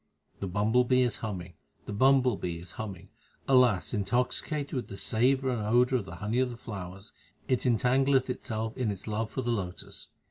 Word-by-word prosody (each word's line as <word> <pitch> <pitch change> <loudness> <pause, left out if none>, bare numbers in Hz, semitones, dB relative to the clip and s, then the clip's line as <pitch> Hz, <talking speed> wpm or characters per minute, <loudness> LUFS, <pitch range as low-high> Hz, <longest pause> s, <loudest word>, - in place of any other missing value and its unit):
The 100 - -3
bumble 105 +6 +2
bee 125 +1 +3
is 120 - 0
humming, 95 -5 -5 0.3
the 105 - -5
bumble 130 +1 +4
bee 85 -3 -4
is 85 +1 -11
humming; 95 -3 -7 0.4
alas! 125 -8 +4
intoxicated 125 - 0
with 130 -3 -2
the 100 - -8
savour 130 +5 +2
and 120 -3 -2
odour 125 +4 +3
of 100 - -7
the 85 - -8
honey 105 +6 -1
of 130 -1 +2
the 120 - -8
flowers, 100 -2 -8 0.3
3 - - 0
it 125 - +2
entangleth 130 +3 +3
itself 110 -3 -3
in 125 -4 -1
its 100 -2 -5
love 110 +1 -2
for 130 - -3
the 120 - 0
lotus. 95 -6 -5
115 Hz, 190 wpm, -29 LUFS, 100-125 Hz, 0.4 s, bumble